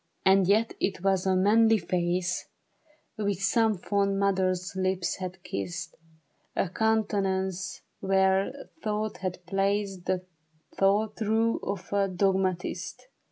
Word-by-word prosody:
And 190 -1 +5
yet 220 +3 +3
it 190 -2 -1
was 195 -1 +2
a 190 - +3
manly 220 +4 +5
face 175 0 -1 0.7
Which 205 -3 0
some 215 +2 +2
fond 200 +1 0
mother's 185 -2 0
lips 185 -1 0
had 185 -1 -6
kissed, 175 - -4 0.6
A 185 - 0
countenance 195 -3 0 0.2
where 190 0 +2 0.3
thought 215 0 -2
had 180 -1 -5
place— 195 +2 0
The 180 0 -2 0.5
thought, 205 +2 +2
though 225 +1 +1
of 200 0 -5
a 200 -1 +3
dogmatist. 190 - -1
195 Hz, 115 wpm, -28 LUFS, 185-205 Hz, 0.7 s, And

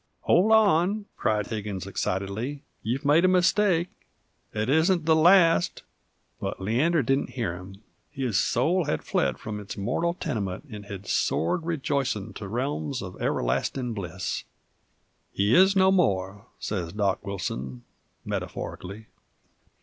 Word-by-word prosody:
"Hold 195 +6 +3
on," 205 -1 +4
cried 105 -2 0
Higgins, 105 -4 -4
excitedly, 100 +8 -3 0.2
"you've 130 +6 -2
made 150 +4 +5
a - - +6
mistake 185 -1 +3 0.6
it 105 +1 -2
isn't 160 +4 +3
the 160 0 +5
last 170 +1 +4 0.3
" - - -44
But - - -3
Leander 135 - +2
didn't 135 +3 +1
hear 110 -8 -1
him 95 +3 -11 0.3
his 130 -9 -1
soul 165 +8 +1
hed 150 - -2
fled 65 - 0
from 105 +6 -6
its 105 -1 -8
mortal 145 - -1
tenement 110 - -4
'nd 105 -1 -8
hed 100 -1 -7
soared 160 - 0
rejoicin' 135 - -1
to 100 - -7
realms 130 +4 -2
uv 90 -1 -9
everlastin' 120 - -1
bliss. 90 -6 -4 0.9
"He 100 +3 +1
is 190 +2 +6
no 190 0 +5
more," 100 - 0
sez 90 -5 -4
Dock 100 -2 0
Wilson, 65 -10 -5 0.4
metaphorically. 100 +4 -5
120 Hz, 135 wpm, -26 LUFS, 100-165 Hz, 0.9 s, a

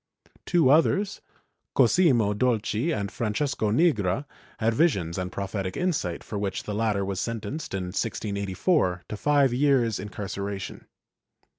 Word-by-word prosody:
Two 165 -7 +4
others, 190 +6 +2 0.5
Cosimo 125 - +4
Dolci 115 +5 0
and 100 - -2
Francesco 110 +2 -1
Nigra 115 - +2 0.3
had 115 +1 +1
visions 95 - +1
and 90 0 -3
prophetic 95 -1 -4
insight, 145 - -1
for 105 - -5
which 100 -2 -2
the 105 - -4
latter 105 -2 0
was 95 -1 -2
sentenced, 115 +4 -4
in 95 - -2
1684, 100 - -1
to - - -5
five 140 +2 +3
years' 125 -4 +2
incarceration. 100 -1 -5
110 Hz, 125 wpm, -26 LUFS, 100-140 Hz, 0.5 s, Two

